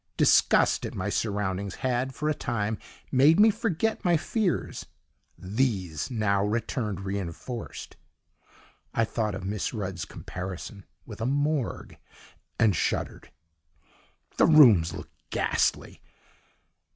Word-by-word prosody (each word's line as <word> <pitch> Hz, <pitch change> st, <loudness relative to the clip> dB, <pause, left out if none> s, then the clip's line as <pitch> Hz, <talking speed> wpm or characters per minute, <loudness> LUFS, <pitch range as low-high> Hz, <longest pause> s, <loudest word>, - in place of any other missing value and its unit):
Disgust -, -, +4 dB
at -, -, -5 dB
my 95 Hz, +2 st, -2 dB
surroundings 100 Hz, -2 st, -2 dB
had, 130 Hz, 0 st, -1 dB
for 150 Hz, -, -2 dB
a 155 Hz, -, +2 dB
time, 110 Hz, -5 st, -2 dB, 0.3 s
made 145 Hz, +7 st, +5 dB
me 220 Hz, +1 st, +7 dB
forget 220 Hz, 0 st, -1 dB
my 175 Hz, -3 st, +3 dB
fears; 195 Hz, +2 st, -2 dB, 0.5 s
these 95 Hz, -, -1 dB
now 105 Hz, -5 st, +1 dB
returned 105 Hz, -1 st, -2 dB
reinforced: 100 Hz, +4 st, -6 dB, 1.0 s
I 115 Hz, -, +3 dB
thought 105 Hz, -2 st, -2 dB
of 95 Hz, -, -6 dB
Miss 105 Hz, +4 st, -3 dB
Rudd's 95 Hz, -5 st, -4 dB
comparison 95 Hz, +2 st, -7 dB, 0.2 s
with -, -, -9 dB
a 115 Hz, -, 0 dB
morgue 145 Hz, -1 st, -1 dB, 0.6 s
and 105 Hz, -4 st, +3 dB
shuddered. -, -, -2 dB, 1.1 s
The -, -, +5 dB
rooms 115 Hz, -, +7 dB
looked -, -, -9 dB, 0.2 s
ghastly! -, -, 0 dB
110 Hz, 115 wpm, -27 LUFS, 100-135 Hz, 1.1 s, me